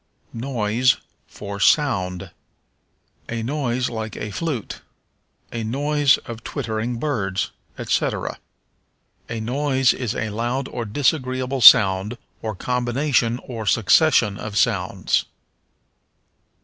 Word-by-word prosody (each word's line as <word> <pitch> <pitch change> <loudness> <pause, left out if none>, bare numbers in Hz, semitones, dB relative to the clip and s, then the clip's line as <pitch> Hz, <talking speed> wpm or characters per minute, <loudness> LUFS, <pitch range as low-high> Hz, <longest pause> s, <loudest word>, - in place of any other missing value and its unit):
Noise 120 0 +1 0.3
for 100 -1 -8
Sound. 95 - +1 1.0
"A 115 -1 -3
noise 125 -1 -1
like 110 -2 -5
a 105 - -5
flute"; 130 0 -4 0.7
"a 115 -1 -4
noise 145 +4 +2
of 115 -1 -8
twittering 115 -2 -3
birds," 110 -9 -2 0.3
etc. - - -1 0.9
A 115 - -4
noise 130 +3 +1
is 120 -5 -3
a 110 -1 -3
loud 120 +5 -2
or 120 - -4
disagreeable 130 +1 -1
sound, 100 +2 +7 0.2
or 110 -2 -4
combination 125 +1 0
or 115 -4 -6
succession 110 -1 +3
of 105 -1 -5
sounds. 85 - +1
120 Hz, 100 wpm, -22 LUFS, 110-130 Hz, 1.0 s, sound